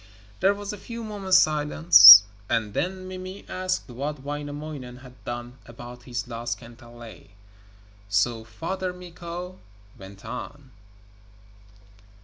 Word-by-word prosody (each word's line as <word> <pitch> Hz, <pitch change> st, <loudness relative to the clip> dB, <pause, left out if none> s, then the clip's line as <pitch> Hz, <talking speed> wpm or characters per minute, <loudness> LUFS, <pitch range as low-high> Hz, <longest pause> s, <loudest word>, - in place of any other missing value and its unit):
There 195 Hz, +2 st, +2 dB
was 205 Hz, 0 st, -7 dB
a 205 Hz, -, -9 dB
few 230 Hz, +3 st, -8 dB
moments' 200 Hz, -4 st, +1 dB
silence, 150 Hz, -, +8 dB, 0.3 s
and 110 Hz, -3 st, -1 dB
then 185 Hz, -, -4 dB
Mimi 185 Hz, +1 st, -9 dB
asked 185 Hz, 0 st, -4 dB
what 140 Hz, +3 st, -6 dB
Wainamoinen 145 Hz, -3 st, -7 dB
had 125 Hz, 0 st, -17 dB
done 120 Hz, +1 st, -7 dB
about 120 Hz, +1 st, -12 dB
his 120 Hz, 0 st, -4 dB
lost 120 Hz, 0 st, -5 dB
kantele, 120 Hz, -1 st, -14 dB, 0.8 s
so 110 Hz, +4 st, 0 dB
Father 180 Hz, -, -5 dB
Mikko 180 Hz, 0 st, -9 dB, 0.4 s
went 95 Hz, +2 st, -13 dB
on. 130 Hz, +4 st, -9 dB
145 Hz, 115 wpm, -24 LUFS, 120-185 Hz, 0.8 s, silence